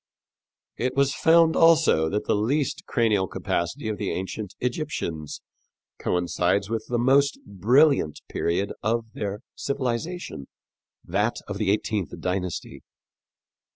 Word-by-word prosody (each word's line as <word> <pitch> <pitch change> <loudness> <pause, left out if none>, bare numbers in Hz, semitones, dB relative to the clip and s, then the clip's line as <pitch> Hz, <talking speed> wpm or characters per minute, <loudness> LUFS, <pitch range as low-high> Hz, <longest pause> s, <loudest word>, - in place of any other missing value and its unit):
It 125 +2 -1
was 140 0 +3
found 165 0 +4
also 160 - +5
that 105 +3 -2
the - - +2
least 130 +7 -1
cranial 105 -5 +2
capacity 100 +11 -2
of 105 -1 -3
the 100 - -1
ancient 95 +1 -4
Egyptians 125 - -3 0.6
coincides 90 +3 0
with 115 - -2
the 120 - +1
most 135 +4 +3
brilliant 105 - +3
period 95 +4 -1
of 115 +2 0
their 105 0 -4
civilization 140 - -3 0.6
that 105 +6 0
of 100 -1 -5
the 105 - +1
eighteenth 105 -3 -1
dynasty. 90 -1 -3
110 Hz, 120 wpm, -25 LUFS, 95-140 Hz, 0.6 s, also